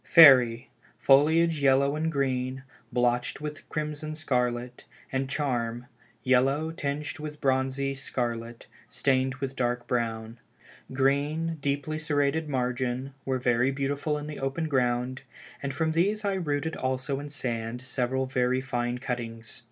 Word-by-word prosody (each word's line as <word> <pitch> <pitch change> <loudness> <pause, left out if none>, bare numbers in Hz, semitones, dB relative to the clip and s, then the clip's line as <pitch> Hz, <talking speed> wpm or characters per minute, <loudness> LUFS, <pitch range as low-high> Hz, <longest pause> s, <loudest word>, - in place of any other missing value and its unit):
Fairy, 125 -8 +7 0.3
foliage 155 +3 +4
yellow 140 +1 +4
and 160 +1 -1
green, 130 -2 -1 0.3
blotched 120 +1 +1
with 150 0 -7
crimson 155 0 -4
scarlet, 125 -4 -1 0.3
and 135 0 -1
Charm, 120 -5 -1 0.4
yellow, 135 +5 +2
tinged 150 0 -3
with 150 0 -6
bronzy 135 0 0
scarlet, 120 -3 -4 0.2
stained 130 -1 +1
with 135 0 -4
dark 120 -1 -1
brown; 115 -1 -2 0.5
green 145 +5 +1
deeply 145 +2 -1
serrated 150 0 0
margin, 125 0 -1
were 130 -1 0
very 125 0 +2
beautiful 140 +2 -1
in 150 - -5
the 150 -1 -6
open 135 +4 -2
ground, 125 -1 0 0.4
and 140 - -2
from 160 +3 0
these 205 +6 +1
I 200 - +1
rooted 160 -3 -1
also 130 +1 -2
in 145 +1 -7
sand 120 -3 -4
several 130 0 -1
very 130 0 +1
fine 120 -2 -2
cuttings. 120 -3 -5
135 Hz, 130 wpm, -28 LUFS, 125-150 Hz, 0.5 s, Fairy